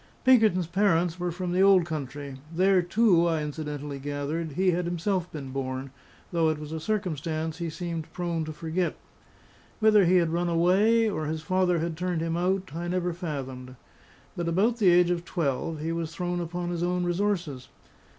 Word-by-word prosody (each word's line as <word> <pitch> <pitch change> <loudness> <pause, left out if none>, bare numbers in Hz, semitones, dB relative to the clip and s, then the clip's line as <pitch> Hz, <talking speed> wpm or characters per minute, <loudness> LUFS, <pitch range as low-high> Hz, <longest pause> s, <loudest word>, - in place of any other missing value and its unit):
Pinkerton's 220 -9 +5
parents 175 -1 +1
were 175 0 -1
from 180 +1 -4
the 180 +2 +2
old 195 -3 +6
country; 145 -3 -5
there 185 +2 +3
too, 175 -1 +3
I 160 -2 0
incidentally 150 -2 -5
gathered, 145 +3 -3
he 185 +4 +2
had 175 0 -1
himself 175 +1 -1
been 140 -4 -7
born, 130 0 -4 0.4
though 165 -2 +2
it 155 - -1
was 150 0 -8
a 160 - -3
circumstance 160 -4 -2
he 170 -1 -2
seemed 165 0 -5
prone 170 -2 -2
to 155 - -5
forget. 165 +3 -2 0.8
Whether 215 -3 +5
he 180 +2 +4
had 170 -2 +3
run 175 0 0
away, 195 +7 +3
or 155 -7 -2
his 155 0 -3
father 185 0 +2
had 165 0 -2
turned 180 -2 -1
him 165 0 -1
out, 185 0 0
I 170 +1 -3
never 180 0 -1
fathomed; 135 -7 -6 0.6
but 170 -1 -3
about 205 +8 +2
the 205 -5 +4
age 175 0 +5
of 175 -1 -1
twelve, 160 -2 -2
he 160 +2 -2
was 165 -1 -4
thrown 175 -1 -2
upon 175 +1 -3
his 170 -1 -3
own 180 +1 0
resources. 175 -7 -1
170 Hz, 180 wpm, -27 LUFS, 155-180 Hz, 0.8 s, old